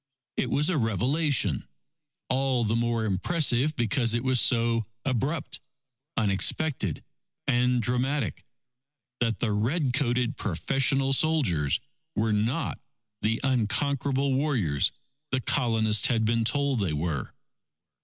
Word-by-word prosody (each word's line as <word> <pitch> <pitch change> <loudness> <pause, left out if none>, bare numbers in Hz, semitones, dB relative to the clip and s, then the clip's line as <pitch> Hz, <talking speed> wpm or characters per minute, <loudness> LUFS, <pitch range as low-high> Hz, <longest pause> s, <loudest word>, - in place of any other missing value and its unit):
It - - -1
was 150 +2 +1
a 160 - +1
revelation, 130 - +1 0.6
all 130 -2 +1
the 110 +2 0
more 115 -1 0
impressive 135 - +1
because 115 0 +1
it 120 - -1
was 130 -2 +3
so 115 -2 +2 0.2
abrupt, 135 +4 -2 0.6
unexpected, 105 - 0 0.4
and 125 -1 +2
dramatic, 125 - -1 0.8
that 115 -2 0
the 115 - 0
red 125 +7 0
coated 125 -1 0
professional 135 - +1
soldiers 125 - +1 0.4
were 110 0 +1
not 115 +10 -1 0.4
the 115 +2 0
unconquerable 135 +2 +1
warriors, 125 - +1 0.4
the 130 - 0
Colonists 115 -5 +2
had 115 -3 +1
been 115 0 +1
told 140 +2 +1
that 100 - 0
they 80 - -2
were. 75 -3 -3
120 Hz, 115 wpm, -27 LUFS, 110-135 Hz, 0.8 s, was